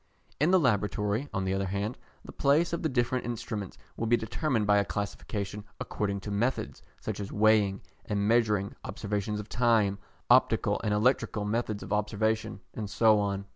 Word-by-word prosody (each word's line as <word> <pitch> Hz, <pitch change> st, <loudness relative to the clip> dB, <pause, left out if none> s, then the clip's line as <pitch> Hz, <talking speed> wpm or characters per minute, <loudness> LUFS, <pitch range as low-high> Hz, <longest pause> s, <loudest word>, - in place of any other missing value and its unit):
In 150 Hz, +4 st, +3 dB
the 185 Hz, 0 st, +5 dB
laboratory, 105 Hz, -, 0 dB
on 95 Hz, -3 st, -2 dB
the 95 Hz, -, 0 dB
other 95 Hz, 0 st, -1 dB
hand, 100 Hz, +5 st, -2 dB, 0.3 s
the -, -, -8 dB
place 150 Hz, +5 st, +2 dB
of 170 Hz, -, -1 dB
the 160 Hz, -, 0 dB
different 125 Hz, -1 st, 0 dB
instruments 110 Hz, -4 st, -5 dB, 0.2 s
will 115 Hz, -, -2 dB
be 120 Hz, +1 st, +4 dB
determined 115 Hz, +1 st, -1 dB
by 105 Hz, 0 st, +4 dB
a -, -, +2 dB
classification 105 Hz, +1 st, -4 dB, 0.2 s
according 100 Hz, -1 st, -2 dB
to 105 Hz, -, -6 dB
methods, 100 Hz, -, -1 dB, 0.2 s
such 110 Hz, -2 st, -4 dB
as 100 Hz, -, -5 dB
weighing 105 Hz, -2 st, +3 dB, 0.2 s
and 100 Hz, -1 st, 0 dB
measuring, 105 Hz, -4 st, +2 dB
observations 105 Hz, 0 st, -3 dB
of 105 Hz, -, -7 dB
time, 110 Hz, -5 st, +2 dB, 0.3 s
optical -, -, +3 dB
and 105 Hz, -, 0 dB
electrical 110 Hz, -2 st, +1 dB
methods 110 Hz, -1 st, -2 dB
of -, -, -4 dB
observation, 110 Hz, +1 st, 0 dB
and 105 Hz, -2 st, -5 dB
so 110 Hz, 0 st, +4 dB
on. 100 Hz, -1 st, -1 dB
105 Hz, 175 wpm, -29 LUFS, 100-115 Hz, 0.3 s, the